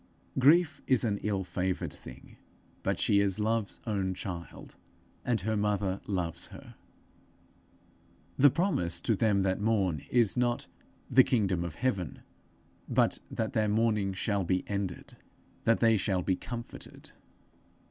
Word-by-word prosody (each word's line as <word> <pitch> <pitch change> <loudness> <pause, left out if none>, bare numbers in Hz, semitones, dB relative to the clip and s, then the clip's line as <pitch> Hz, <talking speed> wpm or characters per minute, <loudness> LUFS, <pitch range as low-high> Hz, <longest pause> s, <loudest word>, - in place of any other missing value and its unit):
Grief 155 +2 +4
is 130 -2 +3
an 105 -3 0
ill 100 -2 -1
favoured 90 +1 -2
thing, - - -13 0.4
but - - 0
she 100 - +3
is 100 0 +1
Love's 110 -1 -1
own 95 -4 -1
child, 90 -3 -7 0.5
and 115 -4 0
her 110 +4 -1
mother 100 -2 0
loves 85 -5 -2
her. - - -12 1.6
The 145 +2 +7
promise 105 - 0
to 115 - +1
them 100 -2 +2
that 95 +1 0
mourn, 100 -8 +1
is 120 -5 +3
not 120 -1 0 0.4
the 130 - +6
kingdom 100 -10 +1
of 85 -3 -5
heaven, 100 -9 -2 0.7
but - - +2
that 110 -1 -3
their 110 -2 +2
mourning 105 -2 +1
shall 100 +1 -1
be 90 +1 0
ended, 100 -3 -4 0.5
that 115 0 +3
they 115 -1 +5
shall 95 -2 0
be 95 - +1
comforted. 120 +4 -8
105 Hz, 135 wpm, -30 LUFS, 95-115 Hz, 1.6 s, The